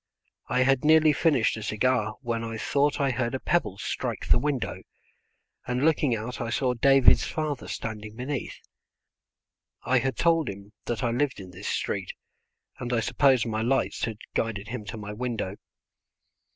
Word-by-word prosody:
I 125 Hz, -, +2 dB
had 135 Hz, -1 st, +2 dB
nearly 155 Hz, 0 st, +6 dB
finished 145 Hz, -6 st, +2 dB
a -, -, -6 dB
cigar 110 Hz, 0 st, 0 dB
when 115 Hz, -2 st, -2 dB
I 115 Hz, -1 st, -4 dB
thought 145 Hz, +5 st, +1 dB
I 140 Hz, -1 st, +2 dB
heard 125 Hz, 0 st, -1 dB
a -, -, -2 dB
pebble 155 Hz, -, 0 dB
strike -, -, -3 dB
the -, -, +5 dB
window, 140 Hz, -3 st, -2 dB, 0.9 s
and 125 Hz, +3 st, 0 dB
looking 150 Hz, -6 st, +3 dB
out 115 Hz, +2 st, -5 dB
I 115 Hz, -, -2 dB
saw 125 Hz, +1 st, +1 dB
David's 135 Hz, +2 st, +5 dB
father 155 Hz, -4 st, -3 dB
standing 110 Hz, -1 st, -6 dB
beneath. 130 Hz, +2 st, -4 dB, 1.3 s
I 130 Hz, 0 st, +3 dB
had 130 Hz, +2 st, -2 dB
told 165 Hz, -5 st, +3 dB
him 100 Hz, +1 st, -9 dB
that 120 Hz, +1 st, -2 dB
I 120 Hz, -, +1 dB
lived 130 Hz, +1 st, 0 dB
in 95 Hz, -2 st, -9 dB
this 90 Hz, +3 st, -8 dB
street, -, -, -2 dB, 0.7 s
and 120 Hz, -, -4 dB
I 120 Hz, -, +2 dB
suppose 125 Hz, +2 st, +3 dB
my 110 Hz, -1 st, -2 dB
lights 135 Hz, +4 st, 0 dB
had 115 Hz, -2 st, -5 dB, 0.2 s
guided 105 Hz, -2 st, -2 dB
him 120 Hz, -3 st, -5 dB
to 105 Hz, -, -6 dB
my 105 Hz, -1 st, -6 dB
window. 110 Hz, -4 st, -3 dB
120 Hz, 165 wpm, -27 LUFS, 110-135 Hz, 1.3 s, nearly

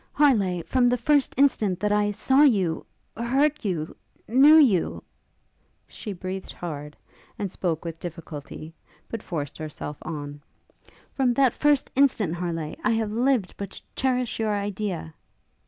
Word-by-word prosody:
Harleigh! 200 Hz, -, +3 dB
from 250 Hz, +4 st, +2 dB
the 250 Hz, -, +2 dB
first 285 Hz, +3 st, +2 dB
instant 215 Hz, -9 st, +2 dB
that 210 Hz, +1 st, 0 dB
I 210 Hz, 0 st, +2 dB
saw 265 Hz, +7 st, +3 dB
you 195 Hz, -, +3 dB, 0.3 s
heard 275 Hz, +6 st, +1 dB
you 170 Hz, -6 st, -3 dB, 0.3 s
knew 275 Hz, +6 st, +7 dB
you 230 Hz, -, +3 dB, 0.4 s
' -, -, -43 dB, 0.2 s
She 215 Hz, -, -7 dB
breathed 185 Hz, 0 st, -6 dB
hard, 150 Hz, -3 st, -7 dB, 0.4 s
and 200 Hz, -3 st, -3 dB
spoke 170 Hz, -4 st, -2 dB
with 165 Hz, -1 st, -5 dB
difficulty; 160 Hz, -2 st, -8 dB, 0.4 s
but 230 Hz, -, -5 dB
forced 150 Hz, -6 st, -5 dB
herself 150 Hz, -1 st, -6 dB
on. 145 Hz, -2 st, -6 dB, 0.7 s
'From 255 Hz, -3 st, +1 dB
that 265 Hz, -2 st, +4 dB
first 295 Hz, -2 st, +2 dB
instant, 250 Hz, -, +3 dB
Harleigh! 170 Hz, -3 st, -3 dB
I 240 Hz, -, +2 dB
have 220 Hz, -2 st, -1 dB
lived 240 Hz, -3 st, +1 dB
but 200 Hz, -2 st, -5 dB
to -, -, -13 dB
cherish 255 Hz, -3 st, 0 dB
your 215 Hz, -2 st, +1 dB
idea!' 200 Hz, -5 st, -4 dB
205 Hz, 145 wpm, -25 LUFS, 170-255 Hz, 0.7 s, knew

